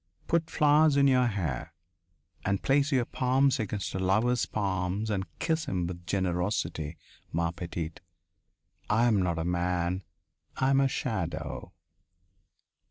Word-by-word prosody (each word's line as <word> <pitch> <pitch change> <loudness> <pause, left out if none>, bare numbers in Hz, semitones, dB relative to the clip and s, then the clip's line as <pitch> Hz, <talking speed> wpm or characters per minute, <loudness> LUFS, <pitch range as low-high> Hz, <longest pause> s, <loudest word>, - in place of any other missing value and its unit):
Put 165 -1 +1
flowers 150 -1 +4
in 140 - +5
your 125 -2 +4
hair. 85 - -3 0.7
And 100 0 0
place 140 +2 +3
your 130 -3 +2
palms 130 +2 +2
against 100 -4 -3
a 95 - -2
lover's 110 +6 +2
palms 100 +1 -1
and 95 -2 -1
kiss 160 - 0
him 90 -2 -1
with 90 0 -7
generosity, 90 -4 -1 0.3
ma 85 +1 0
petite. 85 -1 -5 0.9
I 110 +3 +4
am 110 -5 +3
not 85 -2 0
a 80 - -2
man; 90 +1 0 0.6
I 130 +1 +2
am 135 - +4
a 135 - +4
shadow." 85 - -3
100 Hz, 135 wpm, -29 LUFS, 85-130 Hz, 0.9 s, in